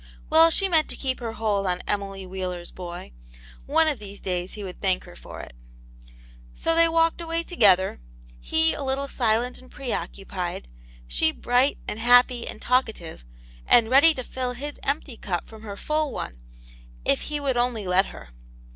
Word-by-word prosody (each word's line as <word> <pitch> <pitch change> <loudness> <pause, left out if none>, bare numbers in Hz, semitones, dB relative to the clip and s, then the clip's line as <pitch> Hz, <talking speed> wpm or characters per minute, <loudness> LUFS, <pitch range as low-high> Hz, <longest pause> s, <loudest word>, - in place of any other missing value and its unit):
Well, 325 +1 +7
she 390 +4 +3
meant 320 -4 +3
to - - -4
keep 260 -2 -2
her 230 -2 -4
hold 205 -3 0
on 180 0 -1
Emily 195 -1 -2
Wheeler's 180 -2 -5
boy: 175 - -8 0.6
one 320 +3 +3
of 295 -5 0
these 205 -1 -9
days 180 -1 -3
he 210 - -7
would 185 -2 -8
thank 185 -2 +1
her - - -13
for - - -9
it. - - -11 1.0
So 330 - 0
they 330 0 +4
walked 330 +1 +2
away 330 0 -2
together; 190 - +3 0.4
he 160 - +3
a - - -5
little 275 +1 -1
silent 240 -1 0
and 255 - -17
pre 270 -5 -4
occupied; 180 - -5 0.4
she - - +2
bright 250 - +1
and 210 - -4
happy 245 0 +4
and - - -7
talk 255 +1 +3
ative, 165 - -9 0.4
and 235 -1 +5
ready 300 +4 +7
to 255 - -4
fill 250 0 -4
his 290 +4 -7
empty 280 -3 -2
cup 175 -5 -3
from 220 -1 -13
her 205 -2 -7
full 305 +2 -1
one, 60 - -6 0.7
if 140 - +2
he 295 -1 -2
would 275 -3 -1
only 240 -4 0
let 185 +2 +3
her. - - -11
230 Hz, 180 wpm, -25 LUFS, 185-275 Hz, 1.0 s, Well